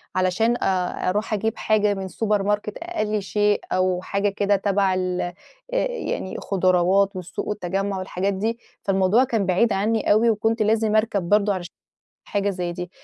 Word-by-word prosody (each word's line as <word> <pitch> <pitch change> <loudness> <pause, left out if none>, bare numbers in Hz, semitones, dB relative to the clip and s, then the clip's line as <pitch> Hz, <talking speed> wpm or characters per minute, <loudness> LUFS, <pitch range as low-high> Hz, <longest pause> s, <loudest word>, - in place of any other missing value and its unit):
علشان 185 +6 +2
آآ 185 -1 0
أروح 210 +3 -1
أجيب 220 +2 -1
حاجة 210 -1 +2
من 195 -1 -5
السوبر 210 +1 0
ماركت، 210 +1 -1
أي 215 - -2
شيء، 205 +1 +1
أو 185 -1 +1
حاجة 200 +2 0
كده 200 0 +1
تبع 195 -1 +1
ال 185 -1 -1
آآ 175 - -3 0.6
يعني 465 - -4
خُضراوات 190 +1 +2
والسوق 180 -2 -5
والتجمع 195 0 -2
والحاجات 185 +1 -2
دي، 225 +5 -2 0.2
فالموضوع 195 +5 +3
كان 225 -6 0
بعيد 195 +5 +2
عني 215 +3 +1
أوي، 225 +3 +4
وكنت 225 +1 +1
لازم 215 0 +2
أركب 205 -5 +1
برضه 205 0 +3
عشان 180 -2 -6 0.6
حاجة 200 0 0
زي 180 -2 -3
دي، 180 0 -6
200 Hz, 160 wpm, -23 LUFS, 185-215 Hz, 0.6 s, أوي